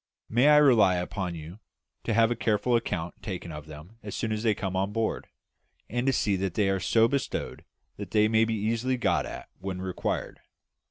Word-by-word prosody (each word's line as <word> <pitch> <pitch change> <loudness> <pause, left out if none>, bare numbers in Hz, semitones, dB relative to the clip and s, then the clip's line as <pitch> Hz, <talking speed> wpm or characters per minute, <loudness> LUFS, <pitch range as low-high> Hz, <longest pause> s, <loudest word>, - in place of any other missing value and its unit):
May 120 +5 +4
I 150 0 +7
rely 120 -10 +6
upon 90 0 -3
you 80 +5 -9 0.5
to 115 - 0
have 115 0 +4
a - - +1
careful 115 +2 +1
account 90 -7 -2
taken 90 -4 -5
of 75 0 -8
them 80 +9 -12
as - - -6
they 110 -1 0
come 95 -2 -3
on 95 +2 0
board, 115 +1 -2 0.6
and 120 +3 -1
to - - +5
see 105 -5 +1
that 95 -2 -2
they 100 -2 +2
are 95 - 0
so 115 +5 +3
bestowed 140 +2 -3 0.3
that - - -6
they 105 0 +3
may 110 0 +3
be 115 0 -1
easily 115 +4 0
got 90 -9 +1
at - - -8
when 95 -1 -5
required? 95 -1 -3
105 Hz, 195 wpm, -27 LUFS, 95-115 Hz, 0.6 s, I